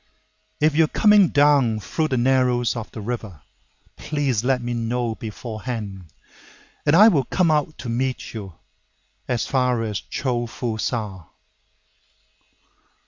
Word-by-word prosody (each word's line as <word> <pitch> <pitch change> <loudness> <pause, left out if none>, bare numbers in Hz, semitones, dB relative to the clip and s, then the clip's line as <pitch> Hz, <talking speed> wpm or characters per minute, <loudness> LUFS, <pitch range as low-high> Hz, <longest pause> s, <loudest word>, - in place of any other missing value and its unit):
If 150 0 +2
you 160 +1 +5
are - - -10
coming 210 -3 +6
down 140 -7 +3
through 155 +9 -2
the 130 - -1
narrows 125 -1 +2
of 115 -2 -5
the 110 - -8
river, 105 - -6 0.5
Please 140 -7 -1
let 130 0 +2
me 120 0 -4
know 120 0 -1
beforehand, 110 -3 -6 0.8
And 145 - +5
I 210 +5 +8
will 145 - +3
come 180 -4 +1
out 150 0 0
to - - -8
meet 125 +2 -2
you, 100 -6 -8 0.7
As 120 -2 -1
far 125 -3 +1
as 105 -3 -3
Cho 120 -3 -3
fu 115 -1 -4
Sa. 105 -8 -3
120 Hz, 140 wpm, -22 LUFS, 110-140 Hz, 0.8 s, I